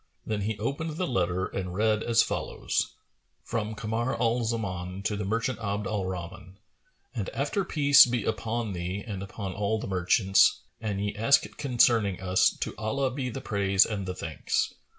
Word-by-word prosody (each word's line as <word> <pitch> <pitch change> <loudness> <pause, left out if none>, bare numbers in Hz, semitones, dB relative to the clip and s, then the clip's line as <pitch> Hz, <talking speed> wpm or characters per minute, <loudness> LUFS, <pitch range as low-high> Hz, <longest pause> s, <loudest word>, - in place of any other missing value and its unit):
Then 105 -1 -2
he 105 +1 -2
opened 155 +5 -3
the 185 - 0
letter 90 - 0
and 90 -2 -4
read 110 +1 +2
as 115 0 +4
follows, - - -2 0.5
"From 110 -1 -3
Kamar 115 +3 -2
al 120 0 +1
Zaman 95 -5 -3
to 105 0 0
the 105 -1 -3
merchant 115 +3 -1
Abd 105 -2 -2
al 100 -2 -2
Rahman. 95 +1 -7 0.6
And - - -3
after 200 - 0
Peace 145 -7 +6
be 120 -3 -1
upon 110 0 -2
thee 90 +3 -4
and 100 -4 -5
upon 100 -1 -5
all 105 +3 0
the - - -5
merchants! 95 +2 +3 0.2
An 105 -3 -2
ye 100 +1 -2
ask 115 +6 +4
concerning 115 -7 +3
us, 95 0 +3
to - - -2
Allah 130 +5 0
be 130 -1 -3
the 130 +3 -6
praise 100 -2 +3
and 100 -3 -4
the 90 - -3
thanks. 80 -4 -2
105 Hz, 170 wpm, -28 LUFS, 95-115 Hz, 0.6 s, Peace